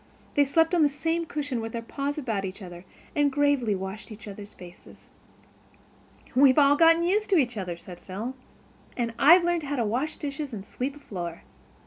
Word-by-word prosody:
They 290 - +4
slept 325 +4 +2
on 345 - +4
the 295 - +5
same 325 +4 -2
cushion 290 -6 -3
with 225 0 -6
their 235 - -3
paws 280 +5 -3
about 225 -9 -2
each 190 +2 -6
other, 175 0 -10 0.3
and 290 -2 +3
gravely 275 -6 +2
washed 190 +4 -7
each 215 +1 -10
other's 205 0 -10
faces. 180 -1 -15 1.2
"We've 260 +1 +5
all 285 -1 +6
got 330 +2 +5
used 410 +4 +1
to 385 - +4
each 245 -5 +1
other," 180 -4 -4
said 175 0 -11
Phil. 210 +7 -6 0.6
"And 235 -2 -1
I've 340 +5 +7
learned 345 -1 +1
how 290 -1 -3
to 240 -4 0
wash 255 +9 -1
dishes 285 -2 -5
and 200 -3 -6
sweep 265 +6 -4
a - - -13
floor." 175 - -6
270 Hz, 190 wpm, -26 LUFS, 210-295 Hz, 1.2 s, I've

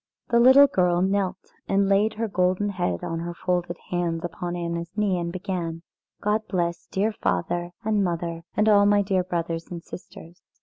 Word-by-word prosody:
The 235 - +4
little 260 +4 +8
girl 180 -7 +2
knelt 190 -1 -1 0.2
and 195 0 +2
laid 200 +2 +2
her 225 +1 -1
golden 185 +1 +1
head 135 - -2
on 165 - -3
her 170 +1 -5
folded 175 -1 -1
hands 175 -2 -1
upon 175 +1 -4
Anna's 170 -1 -3
knee 200 -4 +1
and 170 0 -3
began: 175 -3 -4 0.4
"God 210 +1 +1
bless 170 -1 -2
dear 205 +3 0
father, 175 - -1 0.2
and 215 -2 +2
mother, 170 -2 -2 0.2
and 210 +1 +3
all 205 -1 +6
my 205 0 +4
dear 190 -2 +1
brothers 165 -2 -3
and 170 -2 -7
sisters." 175 -1 -11
180 Hz, 175 wpm, -25 LUFS, 170-200 Hz, 0.4 s, little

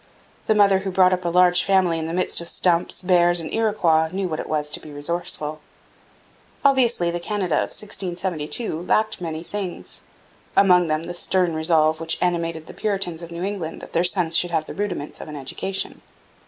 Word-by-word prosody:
The 220 - +3
mother 200 -2 +5
who 195 0 -4
brought 185 0 +4
up 180 -1 -2
a - - +1
large 180 0 +4
family 185 -4 +2
in 160 - -3
the 165 - -4
midst 185 -1 +2
of 170 - -5
stumps, 175 0 0
bears, 175 -1 +3
and 160 - -6
Iroquois 175 -8 +2
knew 190 0 -2
what 155 -2 -4
it - - -6
was 150 -1 -1
to - - +1
be 155 - -12
resourceful. 150 0 -2 1.1
Obviously 240 -10 +3
the 175 - -3
Canada 185 -3 -1
of - - 0
1672 180 -2 -3
lacked 215 +3 0
many 160 -1 -4
things 190 0 -5 0.6
among 180 -3 +5
them 155 +1 -1
the 175 - -5
stern 180 0 +1
resolve 160 -1 +2
which 165 0 0
animated 165 -2 -1
the - - -11
Puritans 195 -5 -2
of 170 - -8
New 170 +1 -6
England 190 -5 -4
that - - -12
their 170 - +2
sons 175 -2 +3
should 175 - +3
have 160 -2 -1
the - - -8
rudiments 185 -7 -4
of - - -8
an 150 - -8
education. 165 +8 -4
175 Hz, 195 wpm, -22 LUFS, 160-190 Hz, 1.1 s, mother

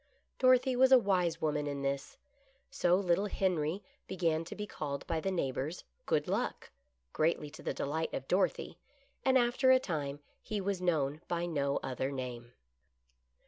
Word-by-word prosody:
Dorothy 255 0 +4
was 260 +1 +5
a 260 - +10
wise 185 -7 +1
woman 150 -1 0
in 140 -1 -3
this. 140 0 -3 0.5
So 180 -10 +3
little 190 +1 +2
Henry 185 -2 0 0.2
began 165 -3 0
to - - -7
be 210 - -4
called 145 -7 -5
by 165 -1 -1
the 195 - -1
neighbors 150 -2 -2
" - - -45
Good - - +1
Luck," - - -2 0.4
greatly 155 -2 0
to 155 - -11
the - - -2
delight 160 +3 -2
of 135 - -5
Dorothy, 185 +2 0 0.4
and 265 0 +4
after 245 +2 +3
a 260 - +8
time 145 - -3 0.2
he 215 -2 -3
was 195 -1 -2
known 155 -4 0
by 175 0 -1
no 140 -5 0
other 130 +1 -2
name. 125 -3 -6
170 Hz, 165 wpm, -32 LUFS, 145-195 Hz, 0.5 s, a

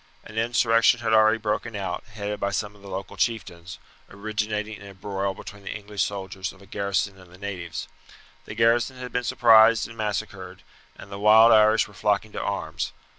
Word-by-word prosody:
An 110 - -13
insurrection 115 +1 +3
had 110 -1 0
already 110 0 +5
broken 110 +1 -3
out, 100 -2 -4
headed 105 -1 -4
by 100 - 0
some 105 +1 -3
of 100 - -19
the 100 - -11
local 95 0 -6
chieftains, 95 -7 -3 0.3
originating 105 +1 -4
in 100 - -11
a 100 - -12
broil 95 0 -3
between 105 +2 -10
the 100 - -8
English 105 -1 -5
soldiers 95 -1 -3
of 95 - -18
a 100 - -16
garrison 100 0 -2
and 90 -2 -17
the 90 - -15
natives. 90 -4 -6 0.6
The - - -8
garrison 115 +3 +2
had 125 -1 -7
been 125 - -1
surprised 110 -1 +5
and 115 - -12
massacred, 100 -4 -5 0.3
and 100 - -13
the 100 - -6
wild 110 +2 +7
Irish 110 0 +5
were 105 - -17
flocking 105 +1 0
to - - -5
arms. 80 -6 -3
105 Hz, 190 wpm, -25 LUFS, 100-110 Hz, 0.6 s, wild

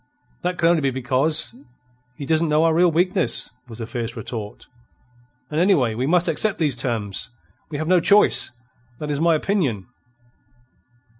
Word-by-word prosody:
"That 180 0 -2
can 165 - 0 0.2
be 140 - 0
only - - +2
because 130 +1 +1 0.6
he 140 - -7
not 160 +2 +2
know 155 -1 +2
our 165 -1 +3
real 175 +1 +3
weakness," 180 +3 +1 0.2
was 115 -2 -10
the 115 - -5
fierce 115 0 -5
retort. 105 -4 -7 0.9
"And, 150 - -1
anyway, 160 - +2
we 125 +4 -2
must 175 +2 +2
accept 195 +6 +1
these 150 -6 +1
terms. 115 -6 -3 0.4
We 150 - -5
have 155 +1 -4
no 180 0 +4
choice. 205 +5 +4 0.5
That 150 +1 -5
is 145 +1 -2
my 165 -1 +3
opinion." 150 - -1
150 Hz, 160 wpm, -21 LUFS, 120-170 Hz, 0.9 s, no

